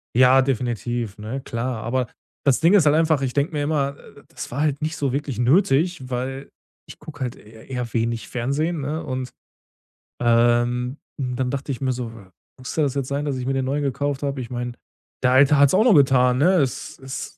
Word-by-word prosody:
Ja, 130 +2 +6
definitiv, 120 -4 -2
ne, 110 +6 -4
klar. 120 -2 -4
Aber 125 +1 -1 0.4
das 135 -3 +3
Ding 165 +4 +4
ist 195 -7 +5
halt 145 0 +5
einfach, 160 -3 +2
ich 130 -2 -1
denke 145 +3 0
mir 145 -1 -1
immer, 145 -2 0
äh: 140 - -16
„Das - - -8
war 135 +4 -3
halt 150 -2 0
nicht 155 +1 -2
so 140 -3 -1
wirklich 140 -3 -3
nötig“, 140 - +2
weil 130 +2 -4 0.4
ich - - -11
gucke 150 -2 -11
halt 125 -2 -2
e 110 +1 -16
eher 125 -3 -4
wenig 115 -1 -1
Fernsehen, 145 +7 -1
ne, 150 +4 -3
und, 130 -1 -4 0.9
ähm 120 +2 +2 0.2
und 125 -2 -2
dann 125 0 -1
dachte 140 +1 -3
ich 130 - -4
mir 130 -1 +1
so: 125 -2 -4 0.5
„Muss 125 - -7
das 145 -4 0
jetzt 135 -2 -2
sein, 140 +2 -2
dass 140 -3 -2
ich 125 - -4
mir 135 - 0
den 135 -1 0
Neuen 145 +2 -1
gekauft 140 +1 -2
habe? 140 -2 -2
Ich 120 - -7
meine, 120 0 -4 0.5
der 125 - +4
Alte 140 +2 +6
hat's 140 -1 +5
auch 210 - +5
noch 245 -3 +5
getan, 130 -4 +4
ne?“ 175 +6 +4
Es 140 -7 -1
ist 135 +1 -7
135 Hz, 210 wpm, -22 LUFS, 125-145 Hz, 0.9 s, Ja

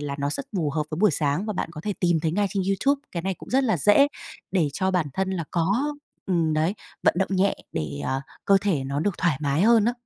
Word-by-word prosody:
là 145 -1 -3
nó 140 0 -1
rất 275 - -4
phù 160 -5 0
hợp 155 +1 0
với 155 - -4
buổi 210 +1 +5
sáng 150 +5 0
và 215 - -1
bạn 190 - -3
có 155 - -7
thể 210 - 0
tìm 175 -3 +2
thấy 155 0 0
ngay 205 +3 +1
trên 195 -2 -1
YouTube, 275 +9 +1
cái 170 - -3
này 190 +1 -1
cũng - - -13
rất 265 +2 +3
là 220 -7 +2
dễ 205 - +5 0.4
để 175 -6 +2
cho 190 +6 0
bản 180 -4 +1
thân 190 0 -1
là 180 -3 -2
có 205 - 0 0.3
ừm, 170 -5 +1
đấy, 160 +6 +1 0.3
vận - - +4
động 190 - +1
nhẹ 195 +1 +2 0.2
để, 75 -3 -3
à, 135 +1 -1 0.2
cơ 200 - +5
thể 180 -10 0
nó 140 +2 -2
được 190 +3 -1
thoải 170 -7 +2
mái 145 +3 +1
hơn 225 -1 +5
á. 240 - +2
180 Hz, 265 wpm, -25 LUFS, 155-205 Hz, 0.4 s, buổi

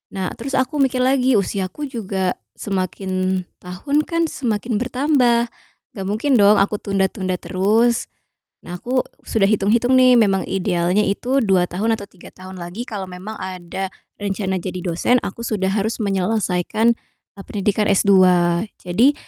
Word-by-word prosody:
Nah 190 -1 -2
terus 270 +3 -3
aku 280 +3 0
mikir 260 -1 +1
lagi 260 -2 +3
usiaku 195 +7 -2
juga 195 -7 -2 0.2
semakin 185 -1 -2 0.2
tahun 180 +12 -3
kan 335 -1 0
semakin 230 -3 -2
bertambah 250 -1 +2 0.4
gak 195 -3 -6
mungkin 230 +7 0
dong 205 +1 +6
aku 205 +1 +2
tunda-tunda 190 -1 -1
terus. 220 +7 +1 0.6
Nah 175 0 -7
aku 255 +1 0 0.2
sudah 220 -3 +1
hitung-hitung 220 +4 +2
nih 255 -1 +6
memang 195 -4 +3
idealnya 180 +1 +1
itu 255 +7 0
2 190 -3 +3
tahun 220 +5 0
atau 200 - -7
3 180 - -14
tahun 185 0 -11
lagi 175 +7 -6
kalau 200 -3 -5
memang 185 +5 -8
ada 185 +1 -5 0.3
rencana 195 -1 -2
jadi 185 0 -5
dosen 180 +9 +2
aku 215 +4 -6
sudah 205 -4 -1
harus 210 +4 -1
menyelesaikan 200 +2 +1 0.4
e - - -12
pendidikan 210 +1 0
S2. 200 0 +4 0.7
Jadi 230 +11 +3
205 Hz, 145 wpm, -20 LUFS, 185-240 Hz, 0.7 s, dong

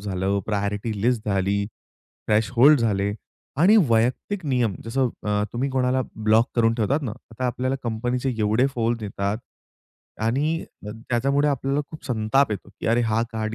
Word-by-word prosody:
झालं, 95 0 -1
priority 105 +1 -2
list 120 -2 +1
झाली, 100 +1 +1 0.6
threshold 120 +6 +5
झाले 100 -3 +1 0.5
आणि 205 +6 +6
वैयक्तिक 125 - +1
नियम, 120 -7 +1
जसं 130 +2 0
अ, 105 0 0
तुम्ही 135 +3 -1
कोणाला 130 0 +1
ब्लॉक 110 +2 +3
करून 115 -1 +3
ठेवतात 130 +7 0
ना, 120 - -3 0.2
आता 125 +3 -2
आपल्याला 130 +2 -1
कंपनीचे 120 +3 -1
एवढे 110 +5 +2
फोन 115 0 0
येतात 100 +1 -2 0.8
आणि 145 +9 0 0.2
त्याच्यामुळे 125 +6 0
आपल्याला 140 +1 0
खूप 155 - -10
संताप 120 +2 +2
येतो, 100 -1 -5
की - - -4
अरे 115 +2 +3
हा 110 0 +1
कार्ड 110 0 -3
115 Hz, 145 wpm, -24 LUFS, 105-130 Hz, 0.8 s, आणि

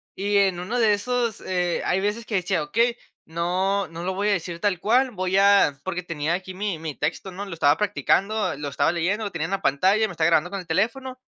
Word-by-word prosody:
Y 205 +1 0
en 190 -3 +2
uno 200 +8 -3
de 220 -3 +4
esos, 235 +1 -1
eh, 180 -2 -1
hay 190 - +1
veces 210 +3 -2
que 215 - -2
decía: 185 -2 0
"Okey, 230 +11 +1 0.3
no 185 +4 -1
no 165 +1 -8
lo 190 +1 -2
voy 200 +2 -1
a - - +3
decir 170 -2 -4
tal 190 -2 0
cual. 250 +7 +3
Voy 185 -4 -1
a". 200 -7 +5
Porque 180 +1 -3
tenía 165 -1 -2
aquí 185 +1 -7
mi-mi 180 -6 -4
texto, 160 +7 -3
¿no?, 195 +3 -6
lo 190 - -7
estaba 145 -3 +3
practicando, 210 +1 0
lo 145 0 -5
estaba 145 +3 +1
leyendo, 180 +6 -1
lo 205 - -4
tenía 160 -2 -3
en 170 - -6
la 195 0 -2
pantalla, 190 +10 +3
me - - -8
estaba 160 -2 +1
grabando 170 +1 +2
con 200 - -3
el 180 - -10
teléfono. 235 +9 -1
190 Hz, 235 wpm, -24 LUFS, 170-205 Hz, 0.3 s, a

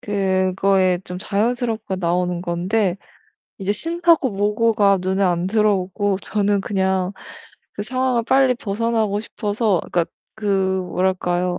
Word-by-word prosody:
그거에 190 -2 +1
좀 180 0 -6
자연스럽게 220 0 -1
나오는 180 0 0
건데 185 +2 0 0.6
이제 195 +1 -1
신나고 335 - +2
뭐고가 205 0 +2
눈에 190 +2 0
안 175 -1 +1
들어오고 205 -1 +1
저는 205 -1 0
그냥 190 -2 0 0.6
그 205 - -5
상황을 255 +1 0
빨리 265 0 +3
벗어나고 220 -1 -1
싶어서 210 -4 -1
그니까 170 -2 +2 0.3
그 220 - -11
뭐랄까요? 185 -2 0
195 Hz, 280 characters per minute, -21 LUFS, 185-220 Hz, 0.6 s, 빨리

